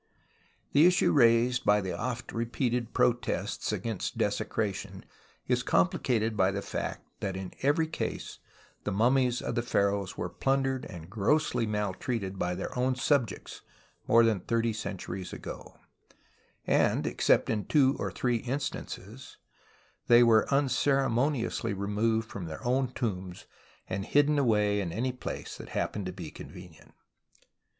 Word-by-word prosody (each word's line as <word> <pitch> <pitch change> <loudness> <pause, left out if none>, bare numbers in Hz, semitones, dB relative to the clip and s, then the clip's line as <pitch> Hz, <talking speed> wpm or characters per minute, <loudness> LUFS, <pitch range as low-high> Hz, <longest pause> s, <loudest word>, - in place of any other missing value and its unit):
Tlie 150 +4 +7
issue 180 0 +3
raised 125 0 +4
by 105 0 +4
the 95 -2 -3
oft 120 -2 -4
repeated 120 0 -1
protests 120 0 0
against 115 -5 -3
desecration 100 -3 -2 0.4
is 125 0 +2
complicated 110 +4 +1
by 95 -2 +3
the 100 0 -3
fact - - -4
that 95 -2 -3
in 95 -1 -6
every 145 +4 +3
case 160 - -5 0.4
the 105 - -2
mummies 125 +4 +2
of - - -2
the 120 - 0
pharaohs 100 -4 0
were 85 - -2
plundered 135 +5 0
and 85 -2 -9
grossly 115 +3 +1
maltreated 105 -1 -2
by 90 0 -1
their 95 - -5
own 130 +1 +1
subjects 130 -1 -1 0.5
more 115 +1 +6
than 110 -4 +2
thirty 115 +4 0
centuries 95 -3 -5
ago; - - -8 0.9
and, - - +2
except - - +2
in 105 -2 -1
two 140 -3 +4
or - - -1
three 120 -2 0
instances, 130 -3 -5 0.7
were 120 -1 +6
unceremoniously 135 -3 +1
removed 110 +3 0
from 100 -5 -6
their 80 +6 -8
own 130 +1 +1
tombs 95 -8 -4 0.4
and 95 +1 -3
hidden 145 +1 +3
awa}^ 105 -6 +2
in 90 -4 -2
any 125 +8 -1
place 125 - -6
that - - -10
happened 100 -3 -2
to - - -3
be 90 -4 -8
con\ - - -10
enient. 90 -3 -14
115 Hz, 140 wpm, -29 LUFS, 100-130 Hz, 0.9 s, Tlie